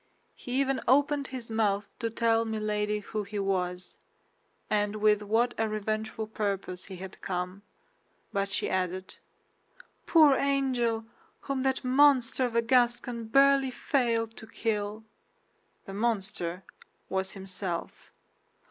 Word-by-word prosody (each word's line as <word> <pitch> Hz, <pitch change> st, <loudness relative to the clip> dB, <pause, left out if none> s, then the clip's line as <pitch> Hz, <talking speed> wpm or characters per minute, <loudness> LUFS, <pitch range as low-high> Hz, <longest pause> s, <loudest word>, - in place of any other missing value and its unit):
He 245 Hz, -, -8 dB
even 270 Hz, 0 st, +1 dB
opened 285 Hz, +2 st, +3 dB
his 245 Hz, -3 st, -7 dB
mouth 205 Hz, -2 st, +1 dB
to 230 Hz, -, -1 dB
tell 230 Hz, 0 st, +2 dB
Milady 210 Hz, -1 st, -1 dB
who 215 Hz, +1 st, -3 dB
he 205 Hz, +1 st, -6 dB
was, 180 Hz, -2 st, -1 dB, 0.7 s
and 210 Hz, 0 st, 0 dB
with 210 Hz, -1 st, +3 dB
what 225 Hz, +4 st, +1 dB
a 225 Hz, -1 st, +1 dB
revengeful 215 Hz, +1 st, -2 dB
purpose 200 Hz, -4 st, -3 dB
he 190 Hz, -, -8 dB
had 185 Hz, +1 st, -9 dB
come; 180 Hz, +1 st, -3 dB, 0.7 s
but 200 Hz, 0 st, 0 dB
she -, -, -1 dB
added, 185 Hz, 0 st, -2 dB, 0.9 s
"Poor 310 Hz, -4 st, +7 dB
angel, 255 Hz, -5 st, +1 dB, 0.4 s
whom 275 Hz, -2 st, -2 dB
that 265 Hz, 0 st, 0 dB
monster 260 Hz, -1 st, +4 dB
of 240 Hz, -2 st, -4 dB
a 230 Hz, -, +3 dB
Gascon 240 Hz, -1 st, +2 dB
barely 275 Hz, +3 st, +5 dB
failed 230 Hz, -4 st, 0 dB
to 225 Hz, -, -10 dB
kill." 215 Hz, -1 st, -2 dB, 0.8 s
The 195 Hz, -, -8 dB
monster 195 Hz, -5 st, -2 dB, 0.4 s
was 190 Hz, 0 st, -2 dB
himself. 190 Hz, -3 st, -5 dB
220 Hz, 125 wpm, -29 LUFS, 200-245 Hz, 0.9 s, Poor